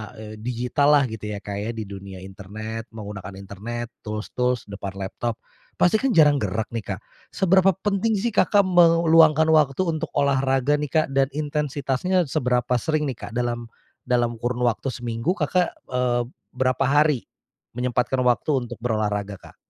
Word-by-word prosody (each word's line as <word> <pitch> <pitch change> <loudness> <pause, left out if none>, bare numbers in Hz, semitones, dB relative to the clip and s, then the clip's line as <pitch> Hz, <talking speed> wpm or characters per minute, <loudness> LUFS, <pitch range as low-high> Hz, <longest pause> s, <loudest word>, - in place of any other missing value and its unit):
eee, 110 0 -9
digital 125 +4 0
lah 140 - +5
gitu 110 -1 -6
ya 100 - -8
Kak 100 0 -4
ya, 105 +3 -3
di 110 - -4
dunia 95 -2 -9
internet, 110 +4 -7
menggunakan 100 -3 -7
internet, 110 +5 -6 0.2
tools-tools, 125 +3 -1
depan 100 -1 -6
laptop. 110 +4 -3 0.4
Pasti 195 +5 +3
kan 265 -5 0
jarang 150 -3 +6
gerak 105 +2 -2
nih 105 -4 -4
Kak, - - -13 0.3
seberapa 190 0 +3
penting 205 +3 0
sih 225 +4 -1
Kakak 205 0 +4
meluangkan 165 -3 +5
waktu 150 +1 +3
untuk 165 -3 -2
olahraga 135 0 +2
nih 150 - -2
Kak? 155 +3 +1
Dan 135 0 +3
intensitasnya 150 +3 0
seberapa 125 -3 0
sering 155 +2 0
nih 125 -7 -4
Kak? 105 - -9
Dalam 120 -1 -2 0.4
dalam 120 -2 +1
kurun 120 +1 -2
waktu 120 +2 0
seminggu 120 - -2
Kakak, 180 -3 0 0.2
eee, 125 -1 +1 0.3
berapa 130 +1 +1
hari 145 -2 +2 0.5
menyempatkan 125 +1 0
waktu 120 +2 +1
untuk 120 -2 -8
berolahraga 105 -3 -1
Kak? - - -16
125 Hz, 155 wpm, -23 LUFS, 110-150 Hz, 0.5 s, jarang